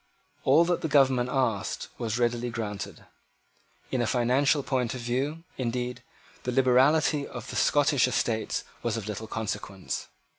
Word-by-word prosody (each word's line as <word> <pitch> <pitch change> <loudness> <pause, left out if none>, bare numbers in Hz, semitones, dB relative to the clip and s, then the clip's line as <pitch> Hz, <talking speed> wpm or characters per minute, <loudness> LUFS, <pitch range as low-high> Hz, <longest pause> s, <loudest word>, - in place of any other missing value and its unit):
All 150 +6 +6
that 175 0 0
the 160 - -1
government 130 -4 +3
asked 115 -7 -1
was 115 -1 -1
readily 120 0 0
granted. 105 -4 -5 0.9
In 130 - +1
a 120 - +1
financial 135 +5 +2
point 130 -3 -1
of 125 - -5
view, 135 +7 -2 0.2
indeed, 125 0 -2 0.4
the 125 - -2
liberality 135 +4 +3
of 120 +1 -8
the - - -6
Scottish 145 -3 +3
Estates 115 -3 -1 0.2
was 115 -1 -1
of 110 -2 -5
little 110 +1 -5
consequence. 100 -4 -4
125 Hz, 145 wpm, -28 LUFS, 115-135 Hz, 0.9 s, All